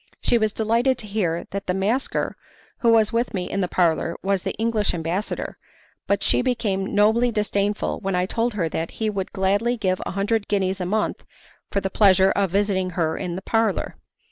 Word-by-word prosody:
She 235 - +2
was 215 -1 +1
delighted 230 +5 +1
to 220 - -7
hear 190 -5 -1
that 200 0 -5
the 180 - 0
masker 215 +8 -1 0.4
who 235 - +3
was 220 -1 +4
with 235 -1 0
me 180 -1 -2
in 195 - -2
the 180 - +1
parlour 170 -1 +1
was 195 -1 +1
the - - -3
English 220 -3 0
ambassador, 170 +5 -3 0.5
but 200 - +1
she - - +3
became 215 -7 -1
nobly 220 +4 +4
disdainful 210 -2 -1
when 195 -2 -2
I 180 0 +1
told 230 +3 -1
her 175 -5 0
that 165 +1 -3
he 220 -1 0
would 195 -2 -4
gladly 205 +6 +1
give 185 -4 0
a - - -5
hundred 205 +2 0
guineas 190 -2 0
a 180 - -2
month 215 +3 -1 0.5
for 200 - 0
the 195 0 -2
pleasure 190 -2 +5
of 200 -2 +1
visiting 195 -1 +1
her 160 -2 +1
in 180 -2 -4
the 190 - -6
parlour. 225 -2 0
200 Hz, 195 wpm, -23 LUFS, 190-220 Hz, 0.5 s, pleasure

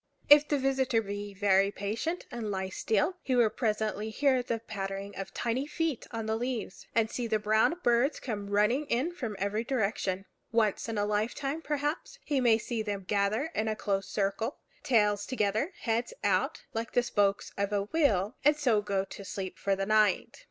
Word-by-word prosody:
If 295 0 +9
the 290 - +1
visitor 265 -3 +2
be 205 -1 -5
very 195 0 +4
patient, 220 - -3
and 235 -3 -4
lie 190 -1 -2
still, 220 - 0
he 260 - 0
will 235 -3 +4
presently 215 -2 -1
hear 260 +2 +2
the 235 -2 -2
pattering 200 -2 -5
of 195 -1 -6
tiny 245 +4 -1
feet 310 -3 -2
on 225 -2 -4
the 220 0 0
leaves, 240 -4 -4
and 225 -1 +3
see 245 -2 -2
the 220 -1 +2
brown 215 +8 +3
birds 240 +4 +3
come 205 -5 -4
running 210 +8 +2
in 265 +8 0
from 245 -12 -5
every 200 +3 -1
direction. 200 -6 -1 0.3
Once 225 -1 +1
in 225 - -3
a 205 - +1
lifetime, 235 +9 -1
perhaps, 295 +9 -2
he 285 -3 +1
may 235 -3 +5
see 230 0 -3
them 205 -2 -3
gather 205 - 0
in 220 - -1
a 215 - 0
close 195 -2 -1
circle 205 +6 -1 0.2
tails 210 -4 +2
together, 220 - 0
heads 230 0 -1
out, 190 -2 +1
like 225 0 -3
the 245 - +3
spokes 200 -4 +1
of 200 0 -1
a 205 -1 +1
wheel, 215 - +1
and 295 +2 +5
so 240 -8 +3
go 200 -2 -1
to 200 - -9
sleep 190 -1 -5
for 195 -1 +1
the 195 0 -2
night. 215 - +2
220 Hz, 185 wpm, -30 LUFS, 200-255 Hz, 0.3 s, If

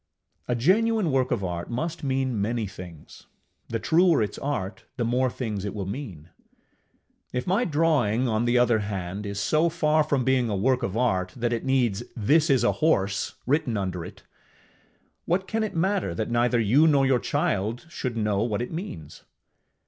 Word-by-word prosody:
A 125 - 0
genuine 200 - +2
work 130 -1 +1
of 100 - -1
art 85 -1 -4
must 155 +8 -3
mean 130 -5 0
many 115 +2 -1
things; 90 -5 -11 0.4
the 115 - -1
truer 160 +4 +3
its 105 - -5
art, 125 -9 -3
the 120 - 0
more 125 +2 +1
things 110 -6 -4
it 100 - -4
will 100 -2 -3
mean. 95 - -7 1.0
If 125 0 -3
my 200 +7 +1
drawing, 145 - +2
on 110 0 0
the 120 +1 +2
other 120 -2 +3
hand, 100 -1 -4
is 100 0 -4
so 155 - +2
far 155 -2 +2
from 140 -3 0
being 130 -2 +2
a 105 - -1
work 125 +6 +1
of 110 -3 -2
art 95 -7 0
that 120 -1 -1
it 115 - -2
needs 125 -6 +1 0.2
THIS 150 +9 +3
IS 130 -4 +3
A 120 - +4
HORSE 100 -11 +1
written 130 -4 +1
under 95 -3 -3
it, - - -11 1.0
what 190 +3 0
can 225 - -1
it 215 -4 -3
matter 185 - 0
that 110 +5 -3
neither 120 0 +2
you 125 +9 +4
nor 140 -3 +4
your 130 -2 +3
child 115 - -1
should 125 -8 -4
know 105 -2 0
what 115 0 -1
it - - -7
means? 125 - -7
120 Hz, 180 wpm, -25 LUFS, 105-145 Hz, 1.0 s, A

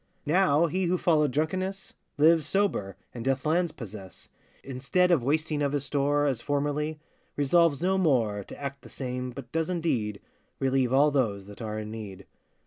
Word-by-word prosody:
Now 165 -1 +3
he 185 +3 -1
who 180 +1 +1
followed 155 -4 +3
drunkenness, 185 +7 -2 0.2
Lives 160 +1 +4
sober, 105 - 0 0.2
and 120 - -6
doth 135 +2 0
lands 170 +2 +2
possess. 105 -7 -10 0.3
Instead 140 +8 +1
of 165 -7 +4
wasting 150 +3 0
of 140 -1 0
his 145 -1 -1
store, 145 +1 +1
As 135 -5 0
formerly, 145 +2 -1 0.4
resolves 155 +1 +3
no 190 +1 +2
more 115 - +1
To - - -11
act 140 -1 -5
the - - -13
same, 125 -1 -4
but 125 -1 -9
does 165 +1 -1
indeed 125 - -1 0.4
Relieve 130 -2 +1
all 145 +3 +5
those 110 -8 0
that 105 +3 -12
are 110 -1 -4
in 110 0 -5
need. 100 -4 -8
145 Hz, 170 wpm, -27 LUFS, 125-165 Hz, 0.4 s, all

